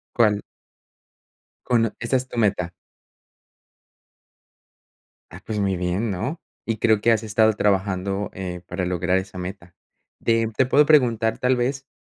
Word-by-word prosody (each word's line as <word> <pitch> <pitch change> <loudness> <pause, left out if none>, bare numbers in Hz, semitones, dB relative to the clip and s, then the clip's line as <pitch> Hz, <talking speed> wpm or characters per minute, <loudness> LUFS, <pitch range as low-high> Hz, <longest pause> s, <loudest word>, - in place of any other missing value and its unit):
¿Cuál? 105 -3 +3 1.2
Cono 115 -3 +2
¿Esa 120 +3 0
es 130 0 -3
tu 120 - -6
meta? 95 -5 +1 2.6
Ah, - - -10
pues 105 -1 -2
muy 95 -2 0
bien, 90 +5 -1
¿no? 130 - -3 0.3
Y 115 -1 -1
creo 110 -2 +3
que 115 - +4
has 110 0 +1
estado 110 0 +3
trabajando, 100 0 0
eh, 90 -2 -6
para 90 +1 -3
lograr 90 +1 0
esa 95 0 -4
meta. 90 -1 -8 0.5
Te 115 -1 +2
te 130 - +3
puedo 145 +3 +5
preguntar 120 -7 +3
tal 125 +1 +2
vez, 130 +2 -2
105 Hz, 140 wpm, -23 LUFS, 95-115 Hz, 2.6 s, puedo